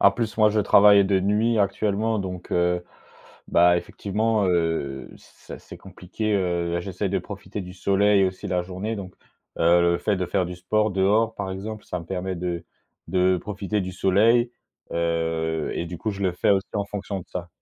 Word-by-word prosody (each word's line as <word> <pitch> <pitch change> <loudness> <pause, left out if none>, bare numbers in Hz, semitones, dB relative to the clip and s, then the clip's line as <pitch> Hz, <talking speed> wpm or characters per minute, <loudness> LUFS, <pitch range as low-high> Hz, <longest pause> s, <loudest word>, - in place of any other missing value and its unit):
en 100 - +7
plus 110 +2 -3
moi 110 -1 +6
je 110 - 0
travaille 100 0 +6
de 95 -1 +2
nuit 105 +4 +1
actuellement, 105 +2 0
donc 90 -2 -6
heu, 90 0 +1 0.7
bah, 85 0 +5
effectivement, 105 +3 -1
heu, 80 -6 -1
c'est - - -13
assez - - -12
compliqué, 105 +4 -4
heu, 85 -3 0
j'essaye 95 +1 -3
de 100 - +1
profiter 100 0 -7
du 90 -1 -9
soleil 100 +1 +3
aussi 95 +2 -3
la 90 -2 0
journée, 95 +5 -4
donc 95 -3 -7 0.5
heu, 85 +1 +5
le 85 0 +2
fait 105 - 0
de 95 - -1
faire 90 +1 0
du 90 - -6
sport 105 +4 0
dehors 105 +4 +2
par 100 -3 -4
exemple, 105 +3 -6
ça 90 - -4
me 85 - -9
permet 95 0 -3
de 85 -1 -3 0.4
de 90 0 +2
profiter 105 +1 -3
du 95 -1 -4
soleil, 110 +6 +3 0.4
heu, 80 -1 -1
et - - -2
du 85 0 -7
coup 110 - -2
je 100 0 -6
le 95 - +2
fais 90 - +1
aussi 95 -1 +2
en 100 -1 0
fonction 100 -1 -5
de 90 - -9
ça. 90 -1 -6
95 Hz, 190 wpm, -24 LUFS, 90-105 Hz, 0.7 s, en